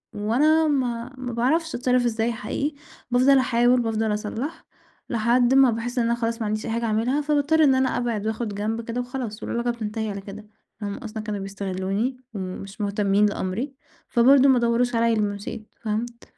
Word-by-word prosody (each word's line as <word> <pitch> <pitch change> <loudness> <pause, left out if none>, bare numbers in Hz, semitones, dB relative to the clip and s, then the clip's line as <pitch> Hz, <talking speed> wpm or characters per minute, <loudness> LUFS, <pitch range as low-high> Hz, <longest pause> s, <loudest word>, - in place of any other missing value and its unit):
وأنا 295 +10 +3
ما 250 -3 -1
ما 250 -2 -5
باعرفش 310 +8 +1
أتصرّف 250 0 +2
إزاي 230 0 0
حقيقي، 280 +7 -3 0.4
بافضل 260 +3 +5
أحاول 245 0 +3
بافضل 225 -1 0
أصلّح 220 +9 -4 0.4
لحد 240 +2 +3
ما 270 -2 +6
باحس 235 +3 -4
إن 235 - +2
أنا 235 0 +2
خلاص 230 0 -2
ما 220 - -1
عنديش 215 +1 -2
أي - - -3
حاجة 230 +1 -1
أعملها، 230 +6 +1
فباضطّر 300 +2 +2
إن 270 -3 +5
أنا 260 -1 +1
أبعد 230 -4 -2
وآخد 220 -1 -3
جنب 220 +3 -2
كده 230 +2 -3
وخلاص، 245 -4 -5
والعلاقة 235 +1 -1
بتنتهي 220 -1 -4
على 200 0 -6
كده، 210 +2 -10 0.3
هم 200 -1 -4
أصلًا 220 0 -6
كانوا 210 -1 -3
بيستغلوني 195 +5 -2 0.2
ومش 195 +1 -6
مهتمين 200 0 +2
لأمري، 205 +6 -2 0.4
فبرضه 265 +3 +6
ما 255 -2 +5
دوّروش 235 +1 +1
عليَّ 230 0 +3
لمّا 205 -1 0
مشيت 210 +1 -8
فهمت؟ 235 +2 -3
235 Hz, 175 wpm, -24 LUFS, 215-250 Hz, 0.4 s, ما